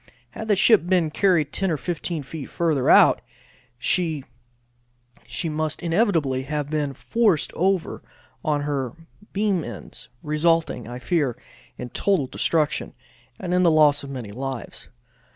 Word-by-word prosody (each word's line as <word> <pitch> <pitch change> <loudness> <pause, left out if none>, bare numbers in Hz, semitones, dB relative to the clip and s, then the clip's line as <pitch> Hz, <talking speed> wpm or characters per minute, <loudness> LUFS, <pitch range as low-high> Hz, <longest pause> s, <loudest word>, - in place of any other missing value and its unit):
Had 220 - -7
the 210 - +4
ship 200 -2 +5
been 175 -4 +2
carried 165 -5 +2
10 195 -1 0
or 160 - 0
15 170 0 -3
feet 140 +1 -8
further 155 -6 0
out, - - +6 0.6
she 155 +1 0 1.2
must 155 0 -2
inevitably 165 - +1
have 145 +1 -3
been 145 -3 -1
forced 210 - +1
over 185 -1 0 0.4
on 150 -2 0
her 140 -3 -2 0.4
beam 200 -4 0
ends, - - -9
resulting, 155 -4 +1
I 120 +1 -6
fear, 140 -2 0 0.4
in 125 - -6
her - - -37
total 195 -8 +1
destruction, 155 +3 -1 0.4
and 180 -1 -3
in 180 - +3
the 175 - +5
loss 150 -2 +5
of 140 - -8
many 125 -6 -6
lives. 120 -2 -6
155 Hz, 140 wpm, -23 LUFS, 140-175 Hz, 1.2 s, out